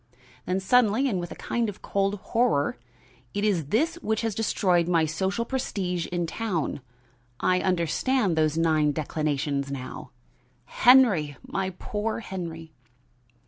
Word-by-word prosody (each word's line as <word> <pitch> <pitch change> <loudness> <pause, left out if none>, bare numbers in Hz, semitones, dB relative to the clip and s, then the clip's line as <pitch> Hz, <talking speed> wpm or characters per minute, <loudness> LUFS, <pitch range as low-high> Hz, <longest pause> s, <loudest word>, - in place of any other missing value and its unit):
Then 185 +1 +1
suddenly 235 +5 +3
and 200 -8 0
with 175 -1 -5
a - - -6
kind 235 -2 -1
of 200 - -10
cold 195 0 0
horror: 205 - 0 0.6
"It 205 - -1
is 190 -8 +1
this 315 - +1
which 220 0 -1
has 225 -2 -1
destroyed 185 -5 +1
my 165 -2 +3
social 190 +8 -1
prestige 185 -9 -2
in 175 -1 -2
town. 170 -5 -2 0.6
I 185 0 +2
understand 185 - +1
those 155 0 +1
nine 155 -3 +2
declinations 145 -2 -2
now. 130 -2 -7 0.6
Henry! 205 - +4
my 190 -1 -2
poor 220 +1 -3
Henry!" 165 -5 -7
185 Hz, 135 wpm, -26 LUFS, 160-220 Hz, 0.6 s, Henry